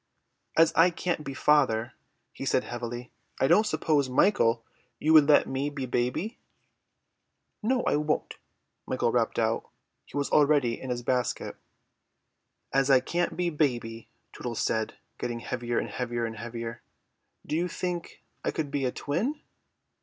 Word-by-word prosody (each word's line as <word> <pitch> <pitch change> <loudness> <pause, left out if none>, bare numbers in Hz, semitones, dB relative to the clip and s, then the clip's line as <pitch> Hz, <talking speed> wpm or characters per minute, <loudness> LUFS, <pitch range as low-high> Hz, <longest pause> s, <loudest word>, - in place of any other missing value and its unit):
"As 165 +1 +6
I 170 +2 +6
can't 175 -2 -2
be 135 -2 -6
father," 130 -5 +3 0.4
he - - -7
said - - +2
heavily, 120 0 -6 0.3
"I - - +3
don't 215 +8 +5
suppose, 145 -9 +1
Michael, 120 - +3 0.3
you 155 +6 +2
would 155 -2 +7
let 150 - +6
me 135 +2 -1
be 140 -2 -4
baby?" 125 - -1 1.2
"No, 245 +3 +1
I - - +2
won't," 150 0 -1 0.5
Michael - - +1
rapped - - +1
out. - - 0 0.4
He - - -7
was 140 - -1
already 145 -5 +3
in 130 - -6
his 120 -1 -2
basket. 125 0 -1 1.2
"As 135 0 +3
I 135 -2 +7
can't 170 +5 -1
be 175 -1 0
baby," 120 -7 -1 0.2
Tootles 120 -2 -5
said, 110 -1 -1 0.2
getting 120 -1 -3
heavier 120 -1 -2
and - - -1
heavier 120 -2 -2
and 115 0 -5
heavier, 115 +1 -6 0.6
"do - - -2
you 175 +2 +1
think 175 -1 -4 0.2
I - - 0
could 150 -3 -3
be 140 -2 0
a 125 - +1
twin?" 215 - -2
135 Hz, 155 wpm, -28 LUFS, 120-160 Hz, 1.2 s, would